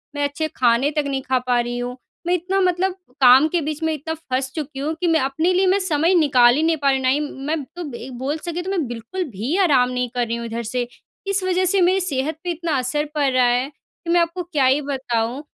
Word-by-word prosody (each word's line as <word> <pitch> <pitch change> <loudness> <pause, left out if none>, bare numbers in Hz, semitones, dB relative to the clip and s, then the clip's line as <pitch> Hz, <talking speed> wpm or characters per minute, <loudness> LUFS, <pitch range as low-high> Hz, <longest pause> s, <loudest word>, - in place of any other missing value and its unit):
मैं 290 - -1
अच्छे 290 +2 -1
खाने 250 +3 +3
तक 300 0 0
नहीं 270 -1 -2
खा 260 -1 +3
पा 245 -1 +3
रही 240 0 -2
हूँ। 245 +1 -4 0.3
मैं 350 - +2
इतना 365 +2 0
मतलब 365 +1 +1 0.3
काम 260 +3 +7
के 350 - +3
बीच 305 +1 -4
में 320 - +1
इतना 310 +2 -4
फँस 265 -4 -3
चुकी 295 -3 -5
हूँ, 300 +3 -1
कि 355 - +1
मैं 325 -1 +3
अपने 295 +6 0
लिए 370 +1 +3
मैं 380 +2 +3
समय 335 -2 +1
निकाल 255 -7 +5
ही 305 - +1
नहीं 325 0 +2
पा 280 - +3
रही 270 - +2
हूँ। 265 - -3
ना - - +4
ही 275 +3 +2
म 295 - -5
मैं 310 -1 -1
तो 345 -5 -6
एक 255 +2 -9
बोल 275 +5 -2
सके 345 +2 -4
तो 375 +2 -4
मैं 345 -8 -1
बिल्कुल 240 +11 -5
भी 230 - -3
आराम 260 -8 +4
नहीं 250 -1 -2
कर 245 -1 0
रही 230 - -2
हूँ 235 - -5
इधर 230 +1 -4
से। 245 +2 -2 0.4
इस 395 -1 0
वज़ह 370 0 +1
से 375 +1 +2
मेरी 370 +2 +4
सेहत 295 -3 -2
पे 355 - -1
इतना 330 -3 -2
असर 265 +4 -1
पड़ 285 -2 +2
रहा 255 -1 +4
है, 245 +2 +1
कि 335 +3 -15
मैं 350 - +4
आपको 340 +2 -2
क्या 310 -6 0
ही 265 +3 +3
बताऊँ। 260 -2 -2
290 Hz, 260 wpm, -21 LUFS, 255-340 Hz, 0.4 s, काम